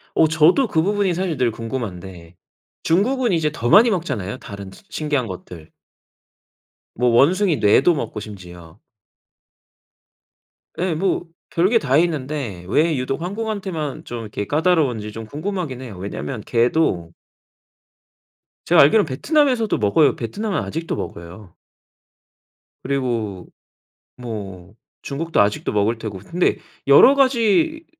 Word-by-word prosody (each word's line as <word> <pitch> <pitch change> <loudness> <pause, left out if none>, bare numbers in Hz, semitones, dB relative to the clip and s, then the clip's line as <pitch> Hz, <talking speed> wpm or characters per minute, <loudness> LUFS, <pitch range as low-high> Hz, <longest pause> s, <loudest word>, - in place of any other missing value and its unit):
어. 160 - +4
저도 160 - +4
그 160 - +1
부분이 200 -2 +1
사실 180 -4 -2
늘 125 -2 +1
궁금한데. 95 -8 -7 0.5
중국은 235 +6 +1
이제 155 -3 +1
더 120 -5 -3
많이 225 - +7
먹잖아요, 130 - -3
다른 100 -5 -9
시 - - -16
신기한 145 -5 -1
것들. 85 -3 -10 1.2
뭐 125 +1 +1
원숭이 170 - +3
뇌도 125 +10 +4
먹고 115 -6 -4
심지어. 90 -4 -11 2.0
예. 180 -2 0
뭐 180 +1 -1 0.3
별 175 +2 +3
게 230 0 +4
다 140 -1 +1
있는데 140 - -3
왜 155 - +2
유독 130 +4 -3
한국한테만 190 -6 -4
좀 120 -1 -6
이렇게 105 -1 -5
까다로운지 145 -10 +1
좀 115 0 -8
궁금하긴 155 - -4
해요. 105 -8 -9
왜냐면 105 +5 -5
개도 115 - 0 1.5
제가 - - +5
알기로는 180 +7 +5
베트남에서도 250 - +1
먹어요. 110 +8 +3
베트남은 200 - -3
아직도 165 +1 -4
먹어요. 85 +3 -8 1.3
그리고 120 -8 -2 0.7
뭐 100 -6 -8 0.3
중국도 160 -1 -1
아직도 100 0 0
먹을 105 +3 +1
테고 105 -4 -6
근데 170 - 0 0.3
여러 255 - +7
가지 275 +5 +2
140 Hz, 270 characters per minute, -21 LUFS, 105-180 Hz, 2.0 s, 많이